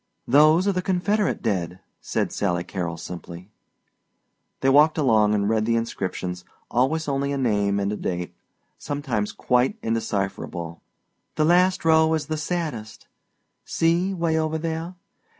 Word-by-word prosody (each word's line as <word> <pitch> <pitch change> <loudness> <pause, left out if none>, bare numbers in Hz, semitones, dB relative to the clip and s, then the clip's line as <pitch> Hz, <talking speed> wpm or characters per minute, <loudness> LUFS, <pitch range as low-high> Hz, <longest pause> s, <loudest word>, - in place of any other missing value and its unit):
"Those 155 +7 +5
are - - +4
the 185 -1 -1
Confederate 195 +3 0
dead," 90 -5 -2 0.2
said - - -2
Sally 90 -3 -1
Carrol 85 -4 -4
simply. 90 +2 -9 1.1
They 135 - +3
walked 150 +4 +5
along 110 -7 +3
and 100 -1 0
read 110 0 +1
the 115 - +2
inscriptions, 95 -5 -3 0.3
always 145 +6 +1
only 140 0 -1
a 140 - -1
name 105 -6 +1
and 100 +1 -1
a - - -2
date, 90 -3 -4 0.5
sometimes 135 -8 -2
quite 125 - +1
indecipherable. 95 -6 -3 0.5
"The 155 - +2
last 180 +2 +3
row 160 0 +4
is 155 - -3
the 155 -1 -3
saddest 150 -9 -4 0.6
see, 170 +3 +1
'way 165 -3 0
over 155 0 -1
there. 165 +2 -4
135 Hz, 140 wpm, -24 LUFS, 100-160 Hz, 1.1 s, Those